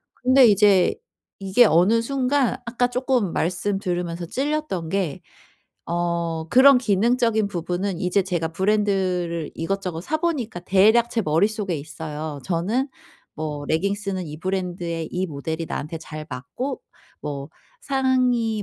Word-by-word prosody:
근데 255 +1 +5
이제 200 -3 +5 0.5
이게 195 +5 +4
어느 200 +5 +4
순간 270 0 +1
아까 245 +1 +1
쪼끔 250 -6 0
말씀 185 +4 -1
들으면서 175 -2 -3
찔렸던 275 - -2
게 185 -5 -2 0.7
어 170 -1 -1
그런 265 +3 +7
기능적인 230 -1 +2
부분은 180 +1 -3
이제 185 +2 +2
제가 175 -4 -2
브랜드를 185 -3 0
이것저것 180 -1 -3
사 310 - -1
보니까 275 - -2
대략 220 +6 +4
제 235 - 0
머릿속에 195 +4 +1
있어요. 150 0 -6
저는 205 +11 0 0.5
뭐 150 -2 -4
'레깅스는 195 +3 -1
이 150 0 -8
브랜드의 175 -3 -3
이 185 +1 -1
모델이 160 +1 -4
나한테 160 +2 -4
잘 155 -1 -8
맞고 140 - -5 0.4
뭐 140 -1 -5 0.3
상의 255 - +1
190 Hz, 275 characters per minute, -23 LUFS, 165-230 Hz, 0.7 s, 그런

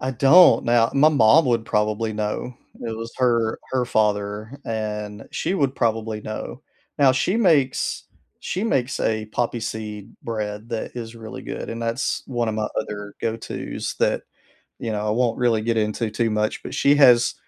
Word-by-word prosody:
I 130 - -2
don't. 140 +8 +6
Now, 120 -1 +3
my 145 +3 +6
mom 145 +2 +5
would 115 -2 +1
probably 110 +1 0
know. 105 +3 -3 0.3
It 115 -1 -4
was 115 +1 -7
her 115 -3 +2
her 130 -1 +1
father, 105 +2 -1
and 105 -1 -4
she 175 - -2
would 140 -7 +1
probably 110 -1 -1
know. 110 +5 -7 0.4
Now 140 -3 +6
she 155 - +1
makes 155 - +2 0.4
she 190 +4 -3
makes 130 - 0
a 110 -1 0
poppy 120 +2 -2
seed 110 -1 -6
bread 105 -1 -4
that 115 -1 -4
is 115 -1 -6
really 110 -1 -8
good - - -6
and 115 0 -5
that's 115 +3 -1
one 120 -3 -1
of 110 - -1
my 110 0 -1
other 105 -1 -5
go 115 0 -1
to's 115 - -5
that, - - +2 0.6
you 115 - -3
know, 105 0 -2
I - - +1
won't 120 +1 +1
really 115 -3 +2
get 115 0 0
into 110 +1 -1
too 115 +2 0
much, 105 0 -1
but, - - -7
she 140 - +4
has 125 -4 +6
115 Hz, 180 wpm, -23 LUFS, 110-125 Hz, 0.6 s, don't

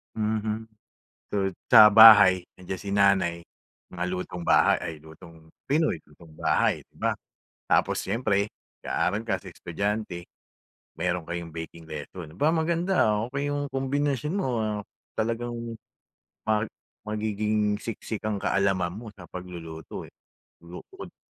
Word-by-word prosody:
Mhm 110 0 -2 0.6
tot 95 -1 0 0.2
sa 105 0 +10
bahay 100 -4 +9
nandiyan 95 +1 -5
si 100 - -7
nanay. 95 -4 +3 0.5
Mga 90 0 -3
lutong 90 -1 -5
bahay - - +5
ay 80 - -5
lutong 80 0 -15 0.2
pinoy, 150 - +1
lutong 75 +1 -18
bahay, - - +1
'di - - -38
ba? - - +1 0.5
Tapos - - +2
siyempre, 100 -1 0 0.3
nag-aaral 105 +5 0
kasi - - -4
estudyante, 100 0 -3 0.7
meron 90 -2 -1
kayong 85 -2 -5
baking 80 0 -8
lesson. 80 +1 -8
'Ba 150 +3 +2
maganda, 170 +3 +2
ah, 105 +2 0
okey 140 +2 -2
yung 145 0 -2
kombinasyon 140 +2 -1
mo, 195 -9 -1
ah. 105 -1 -1 0.3
Talagang 115 +2 -2 0.9
mag 110 0 +1 0.3
magiging 105 0 0
siksik 110 -1 -5
ang 110 -2 -1
kaalaman 95 -3 +1
mo 110 0 -8
sa 95 -4 -13
pagluluto, 85 -3 -8
eh. - - -20 0.5
Luto 85 +1 -10
ko - - -8
din - - -40
105 Hz, 130 wpm, -26 LUFS, 90-110 Hz, 0.9 s, sa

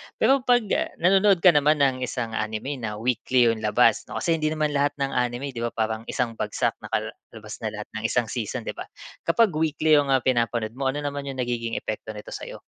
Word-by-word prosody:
Pero 275 0 +4
pag, 245 -2 +3
ah, - - +1
nanonood 190 +1 +4
ka 180 - +9
naman 150 -1 +3
ng 130 -2 +2
isang 115 -2 -4
anime 110 +6 -3
na 110 -2 -4
weekly 120 +1 +2
yung 110 - -4
labas, 110 +1 +3
no? - - -8
Kasi 165 -2 +1
hindi 155 - 0
naman 155 -1 0
lahat 145 0 +1
ng 140 -1 -2
anime, 125 +3 -1
'di 120 - -7
ba, - - 0
parang 110 0 -2
isang 125 -3 -1
bagsak - - -1
nakalabas 110 0 -6
na 110 -1 -4
lahat 105 - -7
ng - - -9
isang 120 -1 0
season, 115 -5 -3
'di - - -3
ba? - - -8 0.4
Kapag 205 +4 +4
weekly 155 -1 +3
yung, 140 - 0
ah, 130 - +3
mga - - -32
pinapanood 115 -2 -1
mo, 135 -1 -1
ano 145 +2 -2
naman 140 -1 -4
yung 135 - -5
nagiging 115 -2 -2
epekto 110 0 -5
nito 105 - -9
sa - - -6
iyo? - - -9
125 Hz, 225 wpm, -25 LUFS, 115-150 Hz, 0.4 s, ka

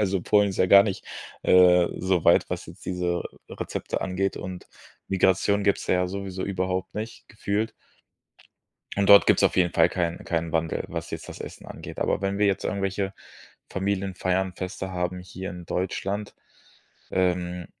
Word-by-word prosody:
Also 95 -3 +1
Polen 105 -1 +3
ist 95 - -7
ja 95 - +4
gar 100 +2 +8
nicht, 100 -3 -3 0.4
äh, 90 -1 +6
soweit, 90 -2 +3
was - - -4
jetzt - - -13
diese 90 -1 -1 0.3
Rezepte - - -4
angeht 95 +1 -1
und 90 -1 -7 0.4
Migration 95 +2 +2
gibt's 100 - +1
da - - +2
ja 90 0 +2
sowieso 95 -1 -4
überhaupt 95 -1 -2
nicht 110 +2 -6
gefühlt. 105 +1 -2 1.3
Und 100 0 +2
dort 100 0 +9
gibt's - - +4
auf - - +3
jeden 90 -2 +3
Fall 80 - +5
keinen 85 -2 -2
keinen 85 -1 -2
Wandel, 80 -1 -1
was - - -5
jetzt - - -6
das - - -9
Essen - - -9
angeht. - - -9
Aber - - 0
wenn 95 0 -1
wir 105 - +4
jetzt 100 - 0
irgendwelche 95 -1 -1 0.6
Familienfeiern, 95 -1 -1
Feste 95 0 -5
haben 90 0 -2
hier 95 +1 -7
in 90 -2 -9
Deutschland, 100 +3 -3 0.8
ähm, 90 -1 0
95 Hz, 160 wpm, -25 LUFS, 90-100 Hz, 1.3 s, dort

